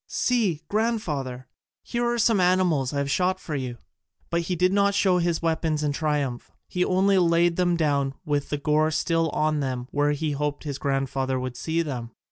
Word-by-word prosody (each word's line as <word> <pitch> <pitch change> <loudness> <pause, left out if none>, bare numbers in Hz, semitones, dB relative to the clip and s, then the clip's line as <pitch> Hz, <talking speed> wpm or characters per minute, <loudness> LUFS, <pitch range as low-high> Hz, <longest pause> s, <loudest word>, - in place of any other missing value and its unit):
"See, 215 -11 0
grandfather, 155 - -2 0.4
here 240 0 -2
are 240 - -1
some 225 -2 +3
animals 180 -7 +2
I 145 - -3
have 140 0 -1
shot 185 +4 +1
for 160 - -7
you." 125 -3 -4 0.5
But 170 0 +1
he 180 +2 -2
did 180 +2 +2
not 200 0 +3
show 190 -3 +3
his 170 -1 0
weapons 160 -2 0
in 145 - +1
triumph: 145 -4 -2 0.2
he 180 - 0
only 190 +1 +3
laid 170 0 +3
them 175 -1 +1
down 140 -4 0
with 145 -2 -1
the 145 - -1
gore 150 +2 +2
still 165 +1 +1
on 155 +1 0
them 130 -3 -3
where 145 0 +2
he 150 +1 -2
hoped 145 0 -2
his 145 -3 -5
grandfather 135 -1 -1
would 125 -1 -4
see 165 +6 -1
them. 125 -6 -5
155 Hz, 190 wpm, -25 LUFS, 140-180 Hz, 0.5 s, some